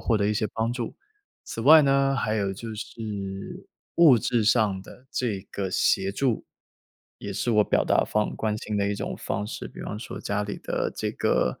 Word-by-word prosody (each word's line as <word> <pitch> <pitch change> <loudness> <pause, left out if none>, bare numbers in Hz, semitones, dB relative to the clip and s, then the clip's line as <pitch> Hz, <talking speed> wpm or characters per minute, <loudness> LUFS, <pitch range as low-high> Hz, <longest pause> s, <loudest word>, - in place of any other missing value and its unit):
获 115 - +1
得 100 - +1
一 105 - +1
些 105 - 0
帮 110 +1 0
助。 120 -2 -4 0.5
此 - - -6
外 155 +5 +9
呢， 135 0 +3
还 110 -3 0
有 100 -2 0
就 110 +3 -7
是 100 -3 -6 0.3
物 160 -7 +8
质 115 0 +1
上 105 -3 +3
的 130 - -15
这 110 -6 -1
个 95 -2 -2
协 95 +1 +2
助， 120 +1 0 0.7
也 100 - -5
是 120 - -1
我 105 -1 +5
表 - - +2
达 - - +3
方 105 0 0
关 110 -1 -1
心 105 -1 -3
的 100 0 +1
一 - - -1
种 - - -4
方 100 - -2
式， - - -6
比 - - -11
方 105 - -5
说 115 - -7
家 100 0 -1
里 105 - -5
的 - - -2
这 - - -2
个 65 - 0
105 Hz, 215 characters per minute, -26 LUFS, 100-120 Hz, 0.7 s, 外